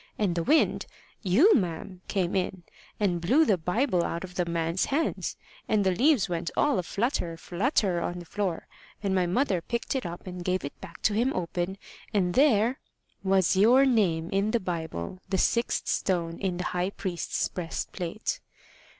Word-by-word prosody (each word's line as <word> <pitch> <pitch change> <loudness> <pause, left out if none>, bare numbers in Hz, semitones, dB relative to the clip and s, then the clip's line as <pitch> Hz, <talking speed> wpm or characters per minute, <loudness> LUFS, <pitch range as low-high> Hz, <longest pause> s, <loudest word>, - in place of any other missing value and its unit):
And 200 -5 +1
the 170 - -1
wind 310 - +2 0.3
you, 240 - +5
ma'am 180 -2 -2
came 185 -3 0
in, 185 -1 -1 0.4
and 180 -5 +1
blew 265 - +4
the 210 - +4
Bible 180 - +1
out 170 +1 -3
of 180 -1 -8
the 180 -1 0
man's 170 +1 0
hands, 305 +4 -1 0.3
and 215 -2 +3
the 190 - +4
leaves 260 - +3
went 170 -1 -2
all 285 -10 +3
flutter, 180 - -2
flutter 185 - 0
on 175 - -3
the 175 - -8
floor, 185 -2 -2 0.4
and 195 -1 0
my 185 -2 +2
mother 190 -1 +1
picked 235 +9 -3
it 260 - -1
up 170 0 -7
and 180 -1 -6
gave 185 -1 -1
it 140 - -8
back - - -11
to 210 - +3
him 240 +5 +2
open, 180 +1 -2 0.4
and 180 -3 +2
there 250 0 +3 0.2
" - - -42
"Was 190 -1 +4
your 240 +8 +6
name 180 -10 +2
in 195 +2 +1
the 235 - +2
Bible 165 - -4
the 190 - +1
sixth 235 +5 +1
stone 170 -3 -1
in 185 -3 -1
the 180 - -2
high 180 +1 0
priest's 185 -3 -2
breastplate." 180 - -4
185 Hz, 175 wpm, -27 LUFS, 175-220 Hz, 0.4 s, your